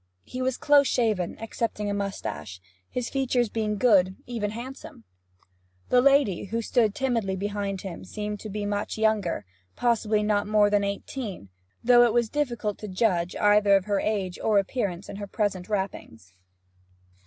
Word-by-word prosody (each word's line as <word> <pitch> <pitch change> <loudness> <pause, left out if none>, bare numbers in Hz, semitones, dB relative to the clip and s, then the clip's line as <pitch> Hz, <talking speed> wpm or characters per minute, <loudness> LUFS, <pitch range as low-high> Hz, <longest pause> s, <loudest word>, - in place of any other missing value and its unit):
He 255 - -6
was 260 0 0
close 285 -2 +5
shaven, 215 -7 0
excepting 225 -1 -3
a 205 - -1
moustache, 95 - -4 0.3
his 250 -1 -3
features 250 -3 0
being 210 -1 -1
good, 200 -5 +5
and 190 - -10
even 230 -4 -3
handsome. 240 - -9 0.9
The 250 - +5
lady, 275 -10 +3
who 230 +4 -2
stood 220 -2 +2
timidly 230 -8 0
behind 200 -1 -3
him, 185 -4 -7
seemed 210 +2 -5
to 215 - -7
be 210 0 -3
much 205 +1 -2
younger 215 - +1 0.3
possibly 220 -3 +1
not 205 -1 +1
more 210 -1 +4
than 205 -1 +3
eighteen, 200 - -5 0.3
though 240 0 +6
it 235 -2 +3
was 235 -2 +2
difficult 240 -8 -2
to 215 - -6
judge 185 -3 0
either 205 -1 +4
of 195 -1 +1
her 205 -2 +1
age 195 -4 -2
or 215 -2 +2
appearance 195 -3 -1
in - - -7
her 205 0 -6
present 195 -3 -2
wrappings. 185 - -4
210 Hz, 165 wpm, -26 LUFS, 195-235 Hz, 0.9 s, though